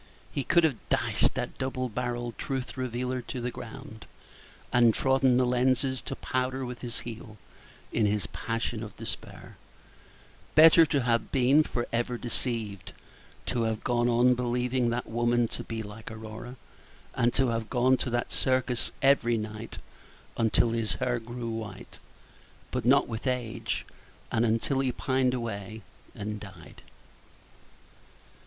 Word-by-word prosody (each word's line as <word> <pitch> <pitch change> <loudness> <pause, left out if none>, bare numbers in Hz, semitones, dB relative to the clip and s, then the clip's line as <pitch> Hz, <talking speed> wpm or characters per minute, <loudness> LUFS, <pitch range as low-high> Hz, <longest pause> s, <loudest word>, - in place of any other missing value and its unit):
He 140 - -2
could 170 +5 +4
have 150 -7 +2
dashed - - +2
that - - -4
double 130 -1 -1
barrelled 120 0 -3
truth 135 -2 -3
revealer 125 0 -2
to 125 +1 -6
the 120 0 -2
ground, 125 -1 -9 0.7
and 120 -2 +5
trodden 130 -1 +3
the 130 - +4
lenses 130 +1 +1
to 135 - -5
powder 130 +1 -2
with 125 0 -7
his 120 -2 -4
heel, 110 -2 -8 0.6
in 110 -2 +3
his 105 -1 0
passion 115 -1 -3
of 105 -3 -8
despair; - - -7 1.0
better 165 +1 +8
to 140 -1 +1
have 115 -2 +1
been 135 +3 +5
for 120 -5 -2
ever 120 +1 0
deceived, 115 -5 -3 0.5
to 120 - 0
have 110 -1 -1
gone 120 0 +2
on 120 +1 +5
believing 125 0 0
that 120 +1 -1
woman 120 +1 +2
to - - -5
be 115 -1 -4
like 105 +1 -9
Aurora, 110 +3 -8 0.6
and 120 +1 +2
to 135 -2 +3
have 115 -1 -2
gone 130 +1 +4
to 130 - -2
that 120 0 -1
circus 130 -2 +1
every 120 -4 +4
night 110 +1 -5 0.6
until 115 +1 +3
his 115 -2 0
hair 120 -2 -1
grew 120 0 -5
white, 110 -4 -7 0.7
but 125 -3 -2
not 140 +3 +5
with 115 +3 -4
age, 125 -3 -2 0.5
and 115 - +2
until 115 +4 +1
he 135 -1 +1
pined 130 0 +1
away 110 -2 -5 0.3
and 105 0 -4
died. 95 -6 -12
120 Hz, 145 wpm, -28 LUFS, 115-130 Hz, 1.0 s, better